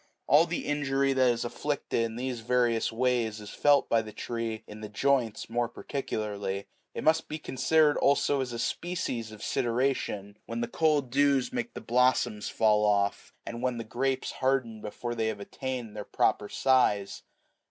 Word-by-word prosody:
All 150 +5 +5
the 170 - -3
injury 140 -2 +1
that 130 -1 +4
is 120 -1 0
inflicted 140 0 -2
in 115 -1 -2
these 125 0 -3
various 120 0 +1
ways 115 -2 0
is 105 -1 -9
felt 145 -1 +4
by 115 - +3
the 110 -1 -9
tree 115 -1 -4
in 105 +1 -10
the 105 - -6
joints 120 0 0
more 120 0 -1
particularly. 105 -7 -4 0.3
It - - -4
must 160 +1 +3
be 155 - -3
considered 150 +2 +2
also 140 0 +3
as 130 -2 -3
a 120 - -4
species 125 -8 -3
of 110 - -11
sideration, 115 -5 -1
when 115 0 -3
the 120 - -1
cold 150 -5 +1
dews 140 - +2
make 240 -1 -3
the - - -6
blossoms 120 -3 +2
fall 105 -1 +3
off, 100 -1 +1
and 115 0 -6
when 125 -1 0
the 115 - -4
grapes 130 +4 -1
harden97 130 -5 0
before 120 +3 -5
they 115 -1 -1
have 110 -2 -3
attained 125 0 -5
their 105 - -4
proper 105 +1 0
size. 125 -7 +2
120 Hz, 175 wpm, -29 LUFS, 110-135 Hz, 0.3 s, All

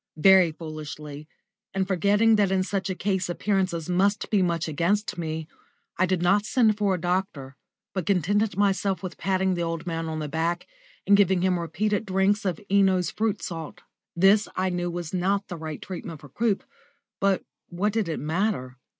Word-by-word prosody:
Very 185 0 +6
foolishly, 155 -2 -8 0.5
and 190 -1 0
forgetting 205 +4 +3
that 205 -2 +3
in 190 -1 +2
such 195 0 -2
a 190 - -2
case 190 -1 -1
appearances 185 -3 -1
must 195 +3 +1
be 205 -3 +3
much 170 -2 0
against 175 +7 0
me, 160 -2 -4 0.5
I 185 - +2
did 180 -1 0
not 200 +3 +4
send 220 -1 +3
for 205 -2 +1
a - - -5
doctor, 175 -7 -2 0.4
but 185 -4 -3
contented 200 +2 +1
myself 195 -2 +1
with 185 - -6
patting 190 +1 +1
the 175 - -2
old 165 0 -3
man 165 -1 -3
on 160 - -3
the 155 -1 -3
back 165 +3 -1 0.4
and 200 - +6
giving 190 -3 +3
him 185 -2 +2
repeated 205 +6 -1
drinks 195 +2 +1
of 180 -4 -1
Eno's 190 -2 +3
Fruit 215 -2 -1
Salt. 165 -3 -6 0.3
This 195 +4 +5
I 185 0 0
knew 175 0 -2
was 175 -1 -5
not 195 +2 0
the 175 - -4
right 155 -2 -6
treatment 170 -4 -7
for 145 - -13
croup, 215 - 0 0.6
but 195 -1 +2 0.3
what 200 +4 -1
did 220 -6 0
it 160 - -2
matter? 155 -5 -1
185 Hz, 180 wpm, -26 LUFS, 165-200 Hz, 0.6 s, Very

